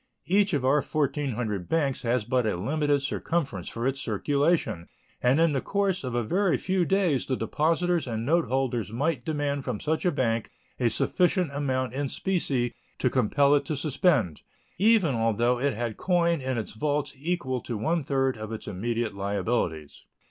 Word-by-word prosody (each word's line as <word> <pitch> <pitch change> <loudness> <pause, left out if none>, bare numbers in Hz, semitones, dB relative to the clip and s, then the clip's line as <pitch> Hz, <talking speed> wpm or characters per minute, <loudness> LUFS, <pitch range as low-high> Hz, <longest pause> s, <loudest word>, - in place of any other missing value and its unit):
Each 200 +2 +3
of 135 -3 -1
our 140 +3 +4
1,400 130 - -2
banks 145 -5 0
has 120 -2 0
but 125 0 +1
a 105 - 0
limited 145 - 0
circumference 140 - -2
for 115 +1 -4
its 135 +1 0
circulation, 140 - 0 0.3
and 125 +4 +3
in 165 -2 +4
the 135 - 0
course 195 -4 0
of 125 -2 -3
a 120 - +1
very 185 - +1
few 185 -1 0
days 185 -8 +1
the 130 - 0
depositors 165 +7 0
and 115 -1 -3
note 165 +4 +3
holders 125 -6 -1
might 135 +2 -1
demand 145 -2 -1
from 125 -6 -3
such 155 +1 -1
a 180 - +3
bank 115 -6 0 0.3
a 120 -2 +3
sufficient 180 - +1
amount 130 -3 -1
in 140 0 -2
specie 135 -11 -1 0.2
to - - +1
compel 140 +6 +3
it 145 - +3
to 155 - -2
suspend, 140 - +1 0.4
even 205 -7 +4
although 115 +2 +1
it 140 -1 0
had 115 -1 -3
coin 170 -3 +1
in 130 -1 -2
its 110 - -4
vaults 145 +5 -1
equal 140 -4 -2
to 120 - -4
one 160 +8 0
third 135 -2 0
of 110 0 -6
its 110 - -6
immediate 115 +3 -2
liabilities. 100 -6 -2
135 Hz, 175 wpm, -27 LUFS, 115-160 Hz, 0.4 s, our